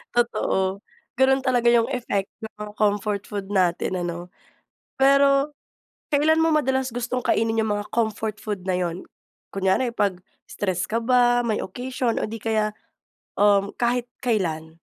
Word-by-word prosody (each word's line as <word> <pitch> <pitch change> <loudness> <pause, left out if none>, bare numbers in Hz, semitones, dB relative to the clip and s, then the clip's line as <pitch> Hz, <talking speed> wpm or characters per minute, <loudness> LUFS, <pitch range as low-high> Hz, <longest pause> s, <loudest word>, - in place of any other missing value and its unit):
Totoo, 195 -5 +1 0.4
ganun 265 0 +4
talaga 245 -2 +2
'yung 235 -1 +4
effect 220 -7 -2
ng 220 - -7
mga 210 0 -6
comfort 205 -1 0
food 200 -2 -5
natin 185 -1 +1
ano? 175 +1 -5 0.7
Pero, 275 +1 +4 0.6
kailan 315 +2 +3
mo 325 - +3
madalas 265 -3 +1
gustong 245 +1 -3
kainin 225 0 +1
'yung 220 - -1
mga 205 0 -4
comfort 220 -2 -1
food 205 -4 -5
na 185 - +1
'yun? 175 0 -3 0.5
Kunyari, 195 +6 +1
'pag 200 -5 0 0.3
stress 185 -3 -2
ka 230 - +1
ba, 245 0 +3
may 215 -2 0
occasion 250 +1 -2
o - - -1
di 225 +1 -6
kaya 215 -1 0 0.7
um, 200 -1 +4
kahit 245 0 +1 0.2
kailan? 160 -9 -1
220 Hz, 145 wpm, -24 LUFS, 195-250 Hz, 0.7 s, ganun